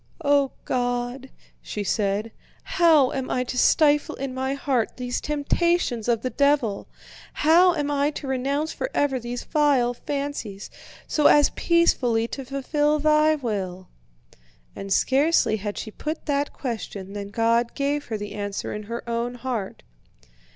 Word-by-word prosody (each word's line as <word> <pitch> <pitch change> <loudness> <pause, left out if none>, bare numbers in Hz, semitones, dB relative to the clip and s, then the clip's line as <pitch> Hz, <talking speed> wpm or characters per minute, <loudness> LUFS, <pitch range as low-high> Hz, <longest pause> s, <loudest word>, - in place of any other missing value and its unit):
"O 280 -1 +3
God," 245 +1 -2 0.3
she 210 - -5
said, 205 +2 -1 0.3
"how 320 -7 +4
am 265 -2 -3
I 250 - 0
to 250 - -6
stifle 295 +3 +3
in 270 -1 -5
my 265 +1 -2
heart 270 -4 -1
these 250 -1 -3
temptations 300 -4 0
of 230 -2 +1
the 255 - -2
devil? 280 -8 +1 0.5
How 340 +4 +5
am 290 -2 -1
I 285 0 +2
to 300 - -7
renounce 275 +4 -1
forever 290 - -1
these 240 +1 -5
vile 280 -6 +2
fancies, 275 -7 -5 0.3
so 300 - +3
as 295 -1 +5
peacefully 250 -10 +2
to 270 - -5
fulfill 290 +3 0
Thy 305 +1 +3
will?" 195 -9 -4 0.9
And 195 0 -7
scarcely 270 - +3
had 205 0 -5
she 215 - -5
put 310 +8 -5
that 285 -1 0
question 205 -6 -6
than 200 -1 -5
God 230 +3 +1
gave 285 +1 -1
her 220 - -3
the 205 0 -7
answer 205 -1 -4
in 210 0 -6
her 235 +1 -5
own 235 +1 -2
heart. 240 -5 -4
260 Hz, 145 wpm, -24 LUFS, 230-290 Hz, 0.9 s, How